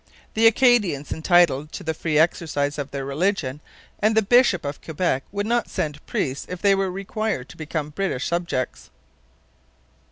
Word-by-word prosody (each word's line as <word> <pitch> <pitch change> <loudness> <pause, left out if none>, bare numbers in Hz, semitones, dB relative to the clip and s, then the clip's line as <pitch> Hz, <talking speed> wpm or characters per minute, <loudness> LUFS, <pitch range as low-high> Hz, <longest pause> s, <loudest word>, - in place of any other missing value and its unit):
The 225 +1 +5
Acadians 220 - +3
were - - -2
entitled 160 -3 +3
to - - -6
the 160 - -1
free 155 -1 -1
exercise 150 -3 +1
of 140 -1 -4
their 135 0 -5
religion, 150 -1 -1 0.4
and 215 +1 +2
the 220 - +5
bishop 240 - +4
of 140 0 -5
Quebec 160 -4 -1
would 205 +1 -2
not 235 +1 0
send 150 -1 -3
priests 135 +1 -2
if 180 - -5
they 200 +1 +4
were 195 -1 0
required 195 - -3
to - - -12
become 155 -1 -4
British 150 -6 -2
subjects. 130 - -2
165 Hz, 165 wpm, -23 LUFS, 145-200 Hz, 0.4 s, The